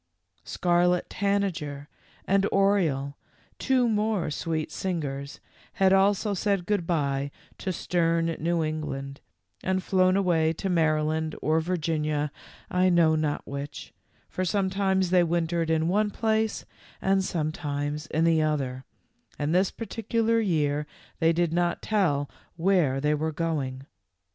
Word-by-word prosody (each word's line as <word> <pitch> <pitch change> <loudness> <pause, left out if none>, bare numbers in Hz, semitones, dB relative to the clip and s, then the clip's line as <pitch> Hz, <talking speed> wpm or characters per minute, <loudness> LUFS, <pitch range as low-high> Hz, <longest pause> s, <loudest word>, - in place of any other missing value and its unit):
Scarlet 175 0 +1
Tanager 180 -8 -1 0.4
and 195 +1 +2
Oriole, 170 -9 +2 0.4
two 255 -2 +2
more 210 -6 0
sweet 155 +1 -2
singers, 145 -6 -4 0.3
had 190 0 +3
also 200 +2 +3
said 195 -1 0
good 200 -5 0
by 140 -4 0 0.3
to 190 - -2
stern 165 -1 0
New 170 +1 0
England 140 -3 -4 0.4
and 190 0 0
flown 185 0 +3
away 165 -4 +2
to 190 +4 -4
Maryland 155 -1 +1
or 155 +1 +2
Vir 180 +3 -1
ginia, 150 -2 -1 0.4
I 185 +1 +3
know 170 -3 +4
not 155 -2 -1
which, 140 +1 -7 0.3
for 185 - -3
sometimes 190 0 +1
they 180 -1 +5
wintered 170 -1 0
in 160 0 +2
one 210 +4 +2
place 220 +1 0 0.3
and 195 0 +2
sometimes 150 -3 -3
in 160 - 0
the 165 -1 +4
other, 135 -4 -1 0.5
and 145 +2 -1
this 185 +2 +3
particular 230 0 -1
year 150 -7 0 0.3
they 165 0 +4
did 165 -1 0
not 175 0 0
tell 165 -10 +1 0.3
where 165 -6 +2
they 150 +2 +1
were 155 +1 -1
going. 145 -5 -3
165 Hz, 130 wpm, -27 LUFS, 150-190 Hz, 0.5 s, they